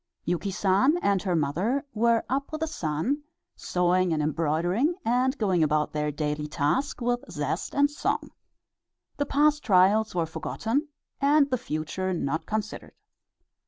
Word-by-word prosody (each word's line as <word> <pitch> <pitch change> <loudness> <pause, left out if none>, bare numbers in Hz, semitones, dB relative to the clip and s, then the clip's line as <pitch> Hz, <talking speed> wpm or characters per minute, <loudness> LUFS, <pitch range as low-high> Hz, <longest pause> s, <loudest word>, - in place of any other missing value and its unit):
Yuki 175 +3 -1
San 195 - +2
and 200 -2 +2
her 180 -2 0
mother 180 - 0
were 230 +1 +2
up 275 +3 -2
with 310 0 -5
the - - +2
sun, 180 - -2 0.3
sewing 180 0 +1
and 155 -2 0
embroidering, 170 - +1
and 255 +4 +1
going 190 -6 +1
about 150 -1 +1
their 150 0 -1
daily 150 0 -2
task 150 - -1
with 245 0 0
zest - - -3
and 285 +1 +3
song. 295 - -2 0.9
The 285 0 -1
past 295 +1 +3
trials 200 +2 +4
were 170 -2 +1
forgotten 225 - -2 0.3
and 285 0 +4
the 255 - +2
future 180 -1 -3
not 160 0 -2
considered. 215 0 -4
195 Hz, 145 wpm, -26 LUFS, 160-260 Hz, 0.9 s, trials